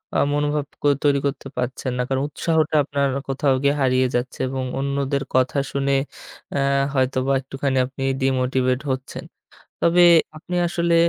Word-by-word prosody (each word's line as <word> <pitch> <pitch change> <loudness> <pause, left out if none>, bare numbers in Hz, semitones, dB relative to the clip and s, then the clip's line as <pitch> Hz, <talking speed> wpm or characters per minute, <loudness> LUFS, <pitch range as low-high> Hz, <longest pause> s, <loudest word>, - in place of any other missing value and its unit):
আ - - +3 0.2
মনোভাব 145 0 0 0.2
ক - - -26 0.2
তৈরি 140 -1 +3
করতে 140 -1 -3
পারছেন 125 +1 -2
না। 125 - +1
কারণ 135 +1 0
উৎসাহটা 160 0 0
আপনার 140 -1 0 0.2
কোথাও 135 0 +1
গিয়ে 140 +1 +3
হারিয়ে 130 0 +3
যাচ্ছে, 120 +1 -2
এবং 130 -1 -3 0.2
অন্যদের 140 0 -1
কথা 130 +2 +2
শুনে 140 0 0 0.6
আ - - +1 0.3
হয়তোবা 130 0 +1
একটুখানি 135 0 -2
আপনি 135 +1 -7 0.2
ডিমোটিভেট 130 -1 +1
হচ্ছেন। 130 0 -5 0.6
তবে 175 +1 +6 0.3
আপনি 180 +3 -6
আসলে 170 0 +1
135 Hz, 145 wpm, -22 LUFS, 130-145 Hz, 0.6 s, তবে